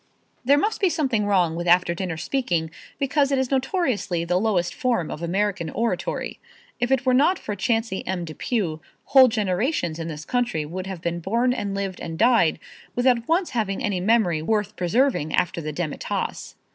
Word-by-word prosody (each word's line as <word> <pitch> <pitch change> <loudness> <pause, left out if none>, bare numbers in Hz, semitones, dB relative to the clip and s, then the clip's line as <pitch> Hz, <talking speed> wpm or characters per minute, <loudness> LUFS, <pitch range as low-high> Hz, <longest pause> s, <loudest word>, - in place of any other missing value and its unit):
There 280 +3 +5
must 425 +10 0
be 380 - +4
something 265 -11 0
wrong 180 -5 +2
with 175 +1 -3
after 175 0 +4
dinner 175 -2 -4
speaking 170 - -1 0.3
because 280 0 +1
it 275 - +2
is 265 0 -1
notoriously 260 - 0
the 180 +1 +1
lowest 190 -5 0
form 240 - -1
of 150 - -6
American 190 0 -1
oratory. 230 +6 -2 0.4
It 245 - 0
if 265 -1 +1
were 255 - +3
not 295 +9 +4
for 210 - -5
Chauncey 225 -1 -1
M. 185 -2 -2
Depew 165 0 -2 0.2
whole 265 -2 +7
generations 205 - -1
in 165 - -4
this 155 -1 -6
country 245 -11 -1
would 185 +5 -6
have 190 -3 -7
been 170 0 -1
born 235 +8 +1
and 200 -5 -3
lived 195 -2 -3
and 165 -1 -5
died 225 -7 +4 0.4
without 245 -2 +2
once 345 +2 +1
having 215 -5 -1
any 200 -3 0
memory 185 -5 +2
worth 210 +4 -1
preserving 185 - +1
after 170 -1 0
the 155 -1 -4
demitasse. 155 -1 -4
205 Hz, 180 wpm, -24 LUFS, 170-250 Hz, 0.4 s, whole